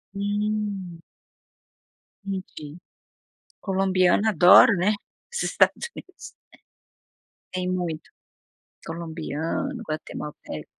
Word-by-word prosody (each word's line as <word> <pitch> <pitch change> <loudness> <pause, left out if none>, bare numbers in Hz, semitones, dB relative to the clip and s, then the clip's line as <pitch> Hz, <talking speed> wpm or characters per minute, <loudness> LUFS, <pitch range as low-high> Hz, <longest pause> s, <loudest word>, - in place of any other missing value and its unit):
Hum. 205 -3 -2 1.2
Entendi, 185 -6 -6 0.8
Colombiano 190 +1 +2
adora, 185 +5 +8
né, 185 +4 +2 0.4
os 480 - -2
Estados 475 - +2
Unidos. 370 -1 -11 1.2
Tem 185 0 -2
muito, 175 -4 -3 0.8
colombiano, 165 - -4
guatemalteco. 150 - -6
185 Hz, 65 wpm, -25 LUFS, 165-205 Hz, 1.2 s, adora